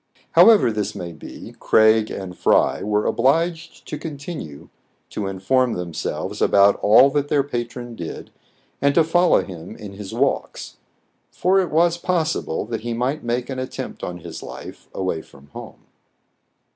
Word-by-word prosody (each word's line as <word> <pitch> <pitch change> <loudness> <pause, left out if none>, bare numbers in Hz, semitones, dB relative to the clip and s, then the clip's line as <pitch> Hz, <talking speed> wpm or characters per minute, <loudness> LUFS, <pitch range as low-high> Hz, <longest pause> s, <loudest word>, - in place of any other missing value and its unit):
However 215 - +6
this 105 -1 -3
may 85 -1 -6
be, 75 - -11
Craig 110 0 +4
and 95 -2 -6
Fry - - +2
were 105 0 0
obliged 165 +6 0
to 150 - -5
continue 145 - -7 0.4
to 100 - -3
inform 120 +7 +1
themselves 85 -2 -4
about 100 0 +5
all 120 +7 +6
that 145 0 0
their 145 -1 +2
patron 120 -2 -5
did, 85 -6 -7 0.5
and 140 0 +2
to 165 - +6
follow 175 +2 +3
him 90 +2 -9
in 100 -2 -9
his 100 -1 -8
walks; - - -2 0.5
for 190 +2 +2
it 185 - 0
was 170 +2 +2
possible 170 -8 -1
that 115 0 -4
he 120 +1 -3
might 130 +6 -2
make 120 +1 -2
an 130 -2 -5
attempt 130 - -6
on 90 -1 -5
his - - -8
life - - -10
away 90 -4 -2
from 70 -1 -19
home. - - -11
120 Hz, 155 wpm, -22 LUFS, 100-150 Hz, 0.5 s, However